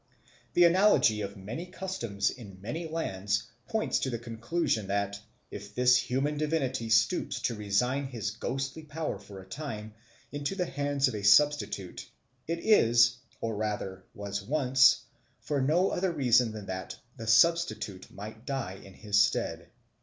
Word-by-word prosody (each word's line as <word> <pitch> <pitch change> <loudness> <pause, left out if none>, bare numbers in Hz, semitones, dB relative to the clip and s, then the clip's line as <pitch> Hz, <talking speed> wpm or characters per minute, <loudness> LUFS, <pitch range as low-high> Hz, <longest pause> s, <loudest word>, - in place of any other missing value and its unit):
The 175 - +6
analogy 170 - +5
of 100 0 -5
many 115 - -6
customs 175 - -2
in 100 -7 -11
many 155 - -5
lands 105 -10 -1 0.2
points 220 -1 0
to 130 - -1
the 120 - -2
conclusion 115 - -2
that, 100 0 -1 0.3
if 105 +1 -9
this 125 0 +5
human 135 +4 0
divinity 135 -7 -1
stoops 110 +11 +2
to 120 - 0
resign 125 +6 0
his 115 -5 -4
ghostly 135 +7 -4
power 155 +1 -4
for 100 -2 -11
a - - -19
time 110 -4 -6 0.4
into 145 +6 -3
the 180 -2 0
hands 140 -2 0
of 130 - -3
a 105 - -4
substitute, 105 -3 +2 0.4
it 170 +1 -2
is, 120 - +5 0.2
or 115 -1 -2
rather 100 -3 -3
was 100 0 -4
once, 130 +2 +4 0.4
for 145 -2 -1
no 165 +8 +2
other 185 0 0
reason 125 -6 +3
than 105 -2 -7
that 95 -1 -5 0.2
the 115 -2 -7
substitute 120 - +2
might 110 +2 -9
die 135 -9 -4
in 95 - -14
his 105 -1 +2
stead. - - 0
120 Hz, 155 wpm, -29 LUFS, 105-150 Hz, 0.4 s, The